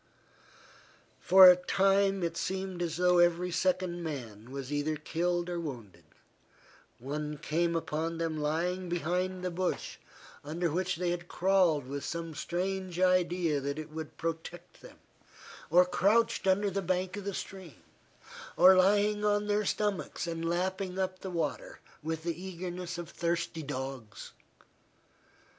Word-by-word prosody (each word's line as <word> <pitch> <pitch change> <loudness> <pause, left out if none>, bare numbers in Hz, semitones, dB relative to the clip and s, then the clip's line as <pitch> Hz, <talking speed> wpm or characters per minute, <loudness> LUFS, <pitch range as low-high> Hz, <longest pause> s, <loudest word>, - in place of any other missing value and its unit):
For 190 +1 +9
a 180 - +10
time 195 +1 +2
it 170 -1 -1
seemed 190 0 -3
as 165 -2 -2
though 180 0 +4
every 175 +1 +3
second 180 0 0
man 120 -9 -6
was 135 +1 -6
either 145 +2 0
killed 175 +3 -1
or 175 -1 -3
wounded; 125 - -8 0.9
one 150 +4 -4
came 170 +3 0
upon 165 0 -2
them 165 -1 -2
lying 175 +4 -1
behind 180 +2 -1
the 180 - -1
bush, 180 +1 -2 0.5
under 165 +3 -2
which 185 +3 -1
they 175 +1 -1
had 175 0 -4
crawled 180 -7 +2
with 140 +1 -5
some 165 -1 -4
strange 185 +2 -3
idea 180 -4 +2
that 140 +1 -3
it 155 0 -7
would 160 -1 -7
protect 165 +2 -6
them, - - -14 0.7
or 180 +3 +6
crouched 200 +4 +2
under 200 +2 +3
the 195 +1 -1
bank 185 +1 -1
of 205 - -6
the 200 -2 -3
stream, 185 -9 -8 0.7
or 185 +1 +8
lying 205 +3 +3
on 205 0 +2
their 210 0 +1
stomachs 205 -3 -1
and 165 -1 -3
lapping 185 +2 -2
up 185 -1 -2
the 190 - -6
water 170 -2 -3 0.2
with 160 +1 -4
the 170 0 -3
eagerness 180 -1 -5
of 175 -1 -6
thirsty 170 0 -2
dogs. 130 -6 -6
175 Hz, 145 wpm, -30 LUFS, 160-185 Hz, 0.9 s, a